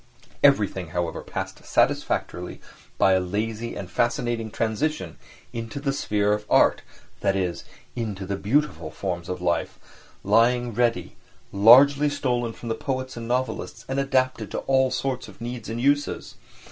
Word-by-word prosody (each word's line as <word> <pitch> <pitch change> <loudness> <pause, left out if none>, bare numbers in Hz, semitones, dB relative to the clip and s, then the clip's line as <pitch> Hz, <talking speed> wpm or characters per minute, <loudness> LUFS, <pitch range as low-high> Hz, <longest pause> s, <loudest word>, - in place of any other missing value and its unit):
Everything, 105 -10 +3
however, 85 -2 -2
passed - - -6
satisfactorily 90 0 0 0.4
by 95 - +5
a 95 - +4
lazy 110 +5 -3
and 95 - -6
fascinating 120 +2 0
transition 110 - -2 0.4
into 115 +3 -5
the 140 -1 -1
sphere 105 -6 +1
of 105 0 -2
art, - - +4 0.4
that 100 -1 +1
is, 90 -3 -2 0.3
into 105 -5 -4
the 100 +1 -2
beautiful 100 - 0
forms 85 0 -4
of 90 -1 -4
life, 85 -2 0 0.5
lying 120 +3 +3
ready, 115 -5 0 0.3
largely 135 +8 +7
stolen 125 -4 -1
from 115 - -10
the 115 - 0
poets 130 +1 -4
and 115 -1 -6
novelists 125 +2 -2
and 135 +1 -1
adapted 130 -2 0
to - - -4
all 130 -1 +3
sorts 130 -1 -2
of - - -14
needs 120 -2 -6
and 115 +1 -3
uses. 145 +3 0
115 Hz, 145 wpm, -25 LUFS, 100-130 Hz, 0.5 s, largely